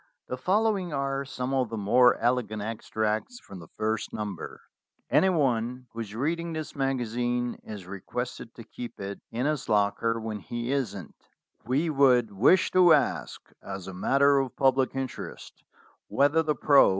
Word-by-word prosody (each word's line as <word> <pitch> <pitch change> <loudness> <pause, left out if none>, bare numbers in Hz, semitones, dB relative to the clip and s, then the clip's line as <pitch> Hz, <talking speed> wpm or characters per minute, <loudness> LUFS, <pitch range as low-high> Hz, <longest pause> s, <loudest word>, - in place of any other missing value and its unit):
The - - -3
following 195 - +1
are 135 0 -1
some 130 0 -4
of 130 -3 +1
the 115 - -4
more 120 +5 +4
elegant 115 -3 0
extracts 110 - -2
from 95 - -11
the 85 - -12
first 110 0 -1
number: 105 -5 -6 0.5
"Anyone 130 -8 +2
who 115 - -9
is 110 -2 -6
reading 165 +6 -2
this 155 -1 -5
magazine 120 -2 -1
is 105 -4 -8
requested 115 +5 -6
to 115 - -10
keep 120 +2 -9
it 100 0 -6
in 120 +3 -2
his 150 -4 -1
locker 105 +2 +1
when 110 -1 -4
he 120 +4 -4
isn't. 100 - -3 0.5
"We 145 +6 +1
would 125 -6 +4
wish 115 - +4
to 180 -3 +6
ask, 145 -3 0 0.2
as 95 -2 -7
a 95 - -6
matter 140 +9 +3
of 135 -2 -3
public 135 -1 +2
in 135 0 0
terest, - - -9 0.6
whether 145 +4 +3
the 155 -2 0
pro. 140 -1 +6
125 Hz, 160 wpm, -27 LUFS, 110-140 Hz, 0.6 s, to